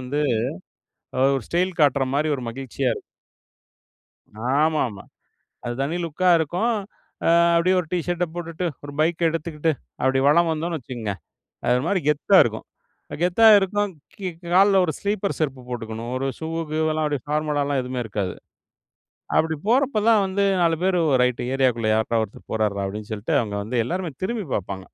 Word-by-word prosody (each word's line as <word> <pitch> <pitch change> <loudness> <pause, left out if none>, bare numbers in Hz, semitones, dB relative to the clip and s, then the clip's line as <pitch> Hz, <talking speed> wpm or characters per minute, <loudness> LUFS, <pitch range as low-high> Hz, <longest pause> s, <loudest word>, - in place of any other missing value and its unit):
வந்து 130 +4 -2 1.2
ஒரு 130 - -5
ஸ்டைல் 180 +1 0
காட்டுற 140 -2 +4
மாரி 150 +2 +1
ஒரு 130 - -7
மகிழ்ச்சியா 130 +2 -3
இருக்கும். - - -9 1.6
ஆமாமா. 150 -10 0 0.6
அது 120 - -2
தனி 145 +5 -1
லுக்கா 175 +3 +1
இருக்கும். 180 +10 0 0.5
ஆ - - +5 0.3
அப்படியே 180 +3 +3
ஒரு 175 - -4
டீ 180 - +1
ஷர்ட்ட 175 0 0
போட்டுட்டு, 170 0 -4 0.2
ஒரு 145 - -7
பைக்கை 165 +2 +1
எடுத்துக்கிட்டு, 160 -1 -1 0.3
அப்படி 130 +1 +2
வலம் 170 +3 +4
வந்தோம்னு 165 +1 -2
வச்சுக்கோங்க, 120 -6 -5 0.5
அது 125 - +3
ஒரு 125 - -2
மாரி 195 +1 +2
கெத்தா 150 +6 +4
இருக்கும் 110 -1 -4 0.6
கெத்தா 180 +6 +3
இருக்கும். 205 +1 0 0.3
கீ 195 - -5 0.3
கால்ல 195 +2 +6
1 160 - -1
ஸ்லீப்பர் 200 -1 -1
செருப்பு 135 -5 -2
போட்டுக்கணும். 115 -1 -5
ஒரு 135 +1 -2
ஷூ 160 - -5 0.2
கீவெல்லாம் 155 0 0
அப்டி 145 -2 -1
ஃபார்மலாலாம் 145 -2 0
எதுவுமே 125 0 -4
இருக்காது. 100 -3 -3 1.0
அப்டி 160 0 +1
போறப்ப 260 0 +3
தான் 220 -3 +5
வந்து 195 +1 0 0.2
4 165 -1 +3
பேர் 185 -1 +2 0.2
"ரைட் 125 -1 +1
ஏரியாக்குள்ள 125 -4 +1
யார்றா 110 +1 +1
ஒருத்தர் 105 - -14
போறாருரா" 105 -3 0
அப்டின்னு 105 +2 -7
சொல்லிட்டு, 105 0 -2
அவங்க 105 -3 -5
வந்து 120 +3 -2
எல்லாருமே 175 +1 -3
திரும்பி 220 -2 -2
பார்ப்பாங்க. 95 -1 -4
150 Hz, 155 wpm, -23 LUFS, 125-175 Hz, 1.6 s, கால்ல